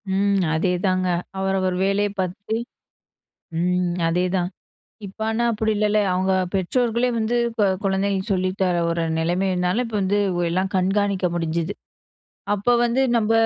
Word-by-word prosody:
ம் 200 -1 +2
அதேதாங்க. 185 +2 +1 0.3
அவரவர் 190 -1 0
வேலைய 200 +1 +1
பார்த்துட்டு 200 +4 -2 1.0
ம் 180 0 0
அதேதான். 180 +1 0 0.6
இப்ப 195 +2 -12
ஆனா 225 +2 0
அப்டி 220 0 0
இல்லல? 210 0 +2 0.2
அவங்க 185 +1 +1 0.2
பெற்றோர்களே 235 +5 +1
வந்து 225 +2 0
இப்ப 225 -2 +1 0.2
குழந்தைகளுக்கு 195 +1 0
சொல்லித்தர 185 -1 0
ஒரு 170 0 0 0.2
நிலைமைனால, 180 +5 0
இப்ப 225 -2 -3
வந்து 200 +2 +1 0.2
உ - - -1
எல்லாம் 185 +3 -1
கண்காணிக்க 195 0 +1
முடிஞ்சது. 165 0 -1 0.8
அப்ப 240 +5 +2
வந்து 240 +3 +1 0.2
நம்ம 220 0 +1
190 Hz, 125 wpm, -22 LUFS, 180-205 Hz, 1.0 s, ம்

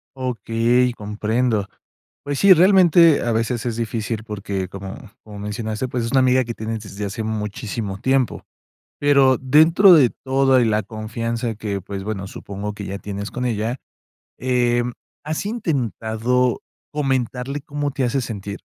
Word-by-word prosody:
Okey, 125 -1 +1
comprendo. 105 0 -1 0.6
Pues 145 -1 -3
sí, 195 -1 +8
realmente 175 -3 +5
a 120 - 0
veces 115 +2 -1
es 115 -2 -2
difícil 110 -1 -3
porque 100 -3 -4
como 95 0 -7 0.3
como 105 -2 -10
mencionaste, 110 +3 -3
pues, 120 -2 -2
es 115 - -3
una 135 - +4
amiga 130 0 +4
que 115 0 -5
tienes 110 0 -4
desde 100 0 -6
hace 105 +3 -4
muchísimo 105 -1 -4
tiempo. 130 -1 0 0.6
Pero 140 -3 +4
dentro 160 +8 +6
de 135 -7 +5
todo 135 -1 +2
y 120 - +3
la 110 -1 +1
confianza 115 +2 -4
que, 100 -2 -4
pues, 95 +1 -6
bueno, 100 -3 -4
supongo 100 +2 -6
que 100 - -7
ya 100 +1 -5
tienes 100 -1 -6
con 125 0 -3
ella, 115 +2 -2 0.6
em, 120 -1 +1 0.3
¿has 155 +6 -3
intentado 125 - -1 0.3
comentarle 135 -1 -1
cómo 145 0 -3
te 135 -1 -2
hace 130 +2 0
sentir? 100 -3 -6
115 Hz, 150 wpm, -21 LUFS, 105-130 Hz, 0.6 s, sí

